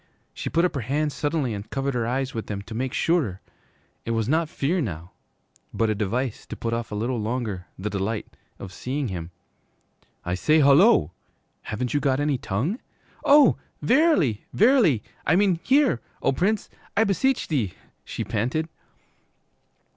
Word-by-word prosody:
She - - -4
put 170 +2 +2
up 180 - 0
her 140 - -2
hands 145 +5 -1
suddenly 145 -5 -1
and 100 +1 -7
covered 135 0 -2
her 120 -2 -1
eyes 130 +2 -1
with 115 - -4
them 100 -1 -4
to 110 - -9
make 130 +3 -2
surer. 140 - +1 0.6
It - - -7
was 115 -2 0
not 160 +3 +1
fear 165 +6 0
now, 85 - -5 0.6
but 115 -1 +2
a - - +2
device 110 +4 -2
to - - -6
put 115 0 -3
off 115 -1 -3
a - - -3
little 120 +3 -1
longer 110 -5 -3
the 105 +3 -4
delight 100 +2 -2 0.3
of 95 -2 -9
seeing 135 +3 -3
him. 85 -3 -5 1.0
'I 90 - -1
say, 155 - +3
hullo! 140 - +5 0.5
Haven't 120 +3 -3
you 145 - +2
got 135 -2 +1
any 145 -3 +1
tongue?' 135 - -2 0.4
'Oh, 285 -3 +6 0.3
verily, 250 - +3
verily, 215 - +4 0.2
I 160 - +3
mean 190 -3 +3
hear, 265 - +3 0.2
O - - +3
Prince, 200 +10 0 0.3
I 220 - +6
beseech,' 180 - 0 0.3
she - - -4
panted. 125 +9 -1
130 Hz, 160 wpm, -25 LUFS, 110-165 Hz, 1.0 s, Oh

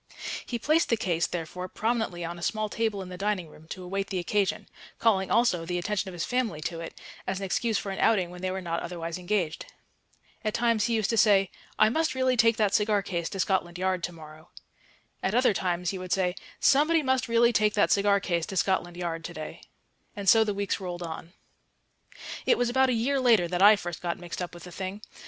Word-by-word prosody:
He 240 - -3
placed 310 +7 +2
the 230 - +3
case, 170 -4 0
therefore, 180 +2 -5
prominently 220 -5 -2
on 170 +1 -6
a - - -11
small 215 +3 -1
table 215 -3 -1
in 185 - -10
the 180 0 -8
dining 195 -5 -1
room 155 +1 -16
to 185 +2 -7
await 195 +2 -3
the 190 - -3
occasion; 195 +2 0 0.3
calling 195 -4 +2
also 230 -8 +2
the 175 +1 -2
attention 195 +2 -2
of - - -9
his 170 -1 -3
family 245 -10 -1
to 165 +1 -4
it, 165 - -8 0.3
as 190 - -1
an 195 - -4
excuse 220 +3 0
for 195 - -4
an 190 - -5
outing 190 -6 +2
when 180 0 -10
they 185 - -1
were 190 +1 -3
not 170 -1 -2
otherwise 170 0 -5
engaged. 180 -4 -2 0.8
At 215 0 -1
times 230 -2 +2
he 235 - +1
used 220 -1 +1
to 230 - 0
say, 195 -3 +4 0.3
"I 215 - +5
must 315 +2 0
really 260 -1 +2
take 230 -1 +4
that 210 -3 +2
cigar 210 -1 +2
case 170 -4 -3
to 195 - -6
Scotland 180 -2 0
Yard 185 -1 -1
to - - -6
morrow." 155 -1 -13 0.7
At 195 - -1
other 250 -3 +4
times 180 -2 -1
he 190 - -5
would 185 0 -7
say, 180 -2 +2 0.3
"Somebody 305 +3 +4
must 260 -1 +1
really 235 +1 +4
take 210 0 +2
that 205 - +3
cigar 200 0 +4
case 170 -4 -1
to 190 - -5
Scotland 175 -2 0
Yard 165 -2 -3
to 175 - -7
day." 155 - -7 0.5
And 200 -2 -6
so 225 +3 +7
the 210 -2 -2
weeks 200 0 -1
rolled 180 -2 -5
on.... 165 +1 -7 1.1
It - - +5
was 245 -1 +1
about 265 +1 +3
a - - +2
year 260 +5 +1
later 230 -9 +4
that 180 +1 -2
I 210 +2 +9
first 175 -4 -6
got 175 0 -2
mixed 175 0 -7
up 175 -1 -5
with 175 - -11
the 180 - -10
thing. 190 +4 -6
195 Hz, 230 wpm, -27 LUFS, 175-220 Hz, 1.1 s, I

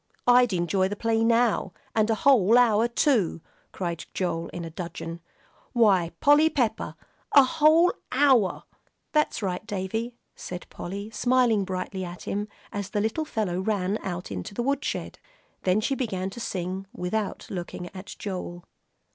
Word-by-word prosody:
"I'd 245 -1 +5
enjoy 185 +1 +1
the 205 - -4
play 225 +1 +1
now. 230 -5 +2 0.2
And 220 0 +2
a 225 - +3
whole 230 -3 +5
hour, 230 -2 +4
too!" 235 - +2 0.3
cried 170 -3 -4
Joel, 170 -3 -1
in 170 -1 -6
a 165 - -7
dudgeon. 170 -1 -6 0.5
"Why, 195 -8 +4
Polly 295 +2 +5
Pepper! 240 -8 -1 0.4
a 280 - +9
whole 320 +4 +4 0.2
hour!" 260 -7 +3 0.5
"That's 300 -7 +1
right, 180 0 -2
Davie," 225 +4 -3 0.2
said 180 0 -7
Polly, 200 +4 -6
smiling 240 -3 +2
brightly 185 +1 -4
at 175 0 -7
him, 205 +1 -2 0.2
as 200 -1 -4
the 210 - -1
little 220 +9 -1
fellow 205 -10 -2
ran 200 0 0
out 180 - -5
into 95 - -6
the 240 - -1
woodshed. 280 +2 -2 0.5
Then 185 +2 +3
she 265 +5 0
began 195 -8 -2
to 235 - -9
sing, 190 -2 -4
without 200 +3 -2
looking 180 -1 -5
at 185 +1 -8
Joel. 180 -3 -5
205 Hz, 150 wpm, -26 LUFS, 185-240 Hz, 0.5 s, a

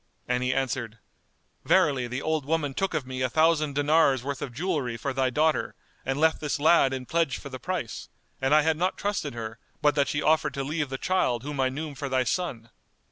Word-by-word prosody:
and 125 0 0
he 125 0 +1
answered, 130 -4 -2 0.7
"Verily 130 -4 +3
the 125 +3 -4
old 160 -2 0
woman 145 -1 -1
took 195 +3 -1
of 150 -4 -1
me 130 0 -5
a 130 - +1
thousand 155 0 +2
dinars' 145 -3 +3
worth 140 0 -4
of 125 - -4
jewellery 135 -4 -2
for 135 +3 -3
thy 130 -1 +1
daughter, 155 +5 +1 0.3
and 135 +2 -2
left 160 +1 +3
this 150 -1 -1
lad 155 -2 +5
in 130 -1 -4
pledge 165 -2 0
for 140 - -9
the 130 -1 -7
price; 170 - -4 0.3
and 135 +3 +3
I 155 - +5
had 160 0 +2
not 180 +3 0
trusted 200 - -2
her, 110 0 -6 0.2
but 150 -1 +3
that 140 -2 +2
she 145 - -1
offered 155 -2 +2
to 135 - -2
leave 150 0 -2
the 135 - -3
child 130 -9 0
whom 145 0 -5
I 130 -1 +3
knew 150 +3 -5
for 140 0 -5
thy 130 -1 +2
Son." 120 -7 -3
140 Hz, 220 wpm, -27 LUFS, 130-155 Hz, 0.7 s, lad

